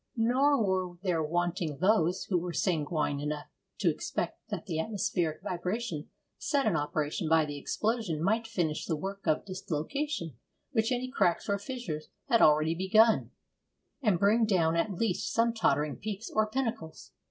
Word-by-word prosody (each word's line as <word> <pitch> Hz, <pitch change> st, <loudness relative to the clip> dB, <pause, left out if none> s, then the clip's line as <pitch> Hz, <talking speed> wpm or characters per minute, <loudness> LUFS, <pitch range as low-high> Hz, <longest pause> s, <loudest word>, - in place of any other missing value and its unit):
Nor 255 Hz, +2 st, +3 dB
were 185 Hz, -2 st, -1 dB
there 175 Hz, -4 st, +1 dB
wanting 170 Hz, -1 st, -1 dB
those 185 Hz, 0 st, +2 dB
who 180 Hz, -3 st, 0 dB
were 175 Hz, 0 st, -4 dB
sanguine 155 Hz, -5 st, 0 dB
enough 150 Hz, 0 st, -3 dB, 0.3 s
to -, -, +3 dB
expect -, -, -4 dB
that -, -, -4 dB
the 160 Hz, -, -2 dB
atmospheric 175 Hz, -4 st, -1 dB
vibration 180 Hz, -2 st, -3 dB, 0.3 s
set 280 Hz, -2 st, +1 dB
in 210 Hz, -6 st, +2 dB
operation 155 Hz, +3 st, -1 dB
by 160 Hz, -1 st, +5 dB
the 145 Hz, -1 st, -5 dB
explosion 215 Hz, -, -1 dB
might 225 Hz, +4 st, +1 dB
finish 170 Hz, -9 st, -1 dB
the 165 Hz, -, 0 dB
work 195 Hz, +4 st, -6 dB
of 155 Hz, -1 st, +2 dB
dislocation 185 Hz, -, -3 dB, 0.3 s
which 225 Hz, 0 st, +1 dB
any 250 Hz, 0 st, 0 dB
cracks 185 Hz, -9 st, +1 dB
or 200 Hz, 0 st, 0 dB
fissures 200 Hz, -, -5 dB, 0.2 s
had 230 Hz, -3 st, +4 dB
already 155 Hz, +1 st, +5 dB
begun, 215 Hz, +6 st, +4 dB, 0.7 s
and 210 Hz, -8 st, +3 dB
bring 210 Hz, +5 st, +4 dB
down 170 Hz, -6 st, +2 dB
at 170 Hz, +5 st, +1 dB
least 190 Hz, 0 st, -1 dB
some 230 Hz, 0 st, +2 dB
tottering 150 Hz, -9 st, +1 dB
peaks 215 Hz, +1 st, -5 dB
or 215 Hz, 0 st, +3 dB
pinnacles. 225 Hz, -9 st, -4 dB
185 Hz, 155 wpm, -30 LUFS, 160-225 Hz, 0.7 s, by